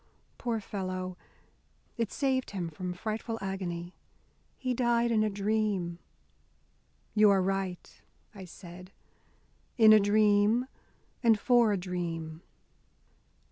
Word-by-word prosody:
Poor 235 -2 -1
fellow, 185 -3 -4 0.8
it 230 -3 -2
saved 265 -2 0
him 180 -4 -4
from 180 +3 -5
frightful 220 +5 -4
agony. 180 -3 -4 0.6
He 255 -1 -2
died 235 -1 +2
in 220 -2 +3
a 215 - +1
dream." 200 -4 -1 1.1
"You 210 -1 +6
are 195 -1 +4
right," 190 -2 -3 0.3
I 195 -3 -9
said, 180 +1 -12 0.9
"in 220 -2 +8
a 215 - +8
dream, 210 +3 +3 0.6
and 225 -4 +4
for 240 -1 +4
a 200 - +1
dream." 170 -3 -4
200 Hz, 110 wpm, -30 LUFS, 180-220 Hz, 1.1 s, in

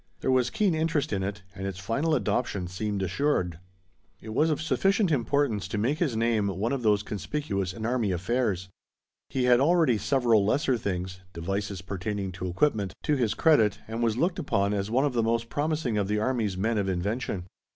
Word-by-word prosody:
There 130 - +1
was 130 -1 +3
keen 200 -5 +1
interest 160 -5 0
in 95 - 0
it 100 +1 -4
and 95 0 -5
its 95 -2 -5
final 140 - 0
adoption 105 -5 -1
seemed 100 +2 -3
assured. 90 - 0 0.6
It 110 - -10
was 155 +7 +3
of 150 - 0
sufficient 195 +4 +2
importance 120 -6 +1
to 105 - -3
make 130 +9 0
his 140 -10 0
name 115 -3 +2
one 100 +6 -1
of 135 - -2
those 105 -2 +3
conspicuous 100 -1 -3
in 110 +3 -6
army 115 -4 +1
affairs. 95 0 -1 0.6
He 130 - -1
had 125 -1 +5
already 155 -6 +3
several 120 -3 +3
lesser 130 +5 +2
things 95 -4 -4
devices 95 +3 -3
pertaining 95 +1 -3
to 95 0 -5
equipment 100 +1 0
to 150 - +2
his 120 -6 0
credit 130 -11 +4
and 115 +2 -4
was 115 -1 +1
looked 175 +6 +1
upon 100 - +1
as 100 0 -1
one 130 +5 +2
of 140 - 0
the 120 - +2
most 115 +1 0
promising 145 -7 -1
of 100 - 0
the 105 +1 0
army's 110 -4 0
men 110 +3 +1
of 95 -1 0
invention. 95 +1 -2
110 Hz, 195 wpm, -27 LUFS, 100-135 Hz, 0.6 s, had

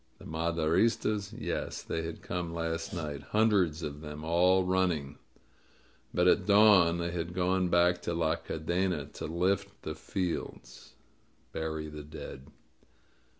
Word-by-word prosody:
The - - -14
Maderis 85 +7 +1
tas? 105 -2 -2
Yes, 115 +1 -4
they 80 - -2
had 80 0 -6
come 90 -2 -3
last 80 0 -2
night 75 -6 -4
— - - -21
^hundreds 100 -7 +3
of 75 -1 -5
them, 75 0 -7
all 90 +3 +4
running. 90 -7 0 0.9
But 90 +1 +2
at 90 0 +4
dawn 100 -5 +6
they 85 0 -2
had 85 0 -4
gone 95 0 +2
back 85 0 +3
to 85 - -2
La 80 -1 +1
Cadena 85 0 -2
to - - -5
*lift 100 +5 -1
the 80 - -3
fields' 90 +2 -5 0.6
(bury 80 -1 -3
the 75 0 -8
dead).'' 75 -2 -9
85 Hz, 145 wpm, -30 LUFS, 80-95 Hz, 0.9 s, dawn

